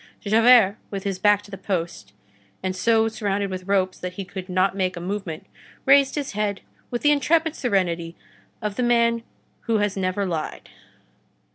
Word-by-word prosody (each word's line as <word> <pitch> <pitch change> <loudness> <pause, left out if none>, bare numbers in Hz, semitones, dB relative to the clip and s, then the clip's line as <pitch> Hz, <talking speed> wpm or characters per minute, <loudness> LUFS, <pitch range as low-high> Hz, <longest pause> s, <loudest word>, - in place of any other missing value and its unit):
Javert, 220 -1 +5
with 195 -2 -5
his 195 -2 -3
back 205 +1 +3
to 205 - -15
the 195 - -7
post, 170 - -4 0.5
and 185 0 -2
so 225 +3 +3
surrounded 205 -3 -2
with 185 0 -6
ropes 190 -2 +1
that 180 0 -5
he 195 +1 -6
could 185 0 -8
not 185 +1 +1
make 185 -2 -1
a - - -4
movement, 180 -3 -5 0.4
raised 275 0 +5
his 290 -2 -3
head 205 -1 -2 0.3
with 240 - -4
the 295 - +5
intrepid 320 +3 +2
serenity 175 -7 -1 0.5
of 210 -1 -3
the - - 0
man 235 -1 +3 0.5
who 225 -1 +2
has 205 -1 0
never 190 +1 -1
lied. 165 -4 -4
200 Hz, 170 wpm, -23 LUFS, 185-225 Hz, 0.5 s, Javert